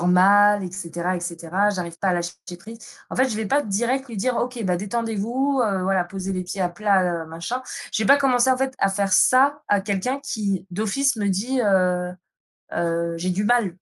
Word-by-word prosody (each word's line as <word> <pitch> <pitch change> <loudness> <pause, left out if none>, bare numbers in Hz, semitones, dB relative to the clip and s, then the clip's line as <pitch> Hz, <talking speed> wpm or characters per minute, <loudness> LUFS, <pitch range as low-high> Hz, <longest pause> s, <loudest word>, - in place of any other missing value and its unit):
normal 200 +3 +5
et 180 - -5
cetera, 175 0 -3
et - - -5
cetera. 175 +3 -1
J'arrive 175 -4 -5
pas 195 - 0
à 185 - +2
lâcher 175 0 -2 0.3
prise». 225 +5 -11 0.3
En - - -5
fait, 260 +1 +3
je 230 - -3
vais 220 - -2
pas 285 +7 +2
direct 240 +6 -1
lui 235 -4 -8
dire: 245 +5 0
«OK, 245 -1 -2
bah, 180 -2 +1
détendez-vous, 230 +6 -1
heu, 195 -4 -1
voilà 190 -1 +1
poser 190 +2 -5
les 185 -1 -3
pieds 180 +2 -6
à 180 - +2
plat, 180 -3 +1
heu, - - -14
machin». 170 +11 -5 0.3
Je - - 0
vais - - 0
pas 280 - +7
commencer 260 -2 +3
en - - 0
fait, 265 0 -2
à 195 - +2
faire 195 -1 -1
ça 280 +3 +4
à 205 -1 +3
quelqu'un 205 +7 -2
qui 200 -9 -3
d'office 220 +8 0
me 205 -2 -1
dit: 235 +7 0
«Heu 180 -3 +1 0.6
heu 170 0 -1
j'ai 180 +2 -2
du 185 +3 -1
mal 220 -5 +2
200 Hz, 215 wpm, -23 LUFS, 180-240 Hz, 0.6 s, pas